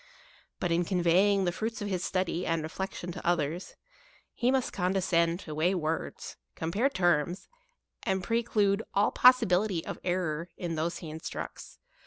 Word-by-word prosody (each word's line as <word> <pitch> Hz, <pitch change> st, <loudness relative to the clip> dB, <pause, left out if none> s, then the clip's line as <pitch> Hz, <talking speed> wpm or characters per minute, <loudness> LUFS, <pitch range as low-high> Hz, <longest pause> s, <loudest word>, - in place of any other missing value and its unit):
But 175 Hz, -, -1 dB
in 170 Hz, +1 st, +3 dB
conveying 185 Hz, +2 st, +3 dB
the 175 Hz, -, +1 dB
fruits 220 Hz, +4 st, -3 dB
of 205 Hz, -, -3 dB
his 185 Hz, -3 st, -2 dB
study 185 Hz, -2 st, -1 dB
and 165 Hz, -2 st, 0 dB
reflection 180 Hz, +2 st, -5 dB
to -, -, -8 dB
others, 170 Hz, +1 st, -1 dB, 0.6 s
he 245 Hz, -, +1 dB
must 265 Hz, -1 st, +1 dB
condescend 180 Hz, -2 st, +1 dB
to 155 Hz, -, -7 dB
weigh 170 Hz, +5 st, +2 dB
words, 160 Hz, -2 st, -3 dB, 0.2 s
compare 205 Hz, +12 st, 0 dB
terms, 175 Hz, -, +1 dB, 0.5 s
and 190 Hz, -1 st, -1 dB
preclude 215 Hz, -2 st, +1 dB
all 200 Hz, +1 st, +3 dB
possibility 215 Hz, -8 st, +4 dB
of -, -, -5 dB
errour 175 Hz, -2 st, -1 dB
in 175 Hz, -2 st, -3 dB
those 165 Hz, +2 st, -1 dB
he 160 Hz, -3 st, -7 dB
instructs. 160 Hz, +2 st, -7 dB
180 Hz, 150 wpm, -29 LUFS, 170-200 Hz, 0.6 s, possibility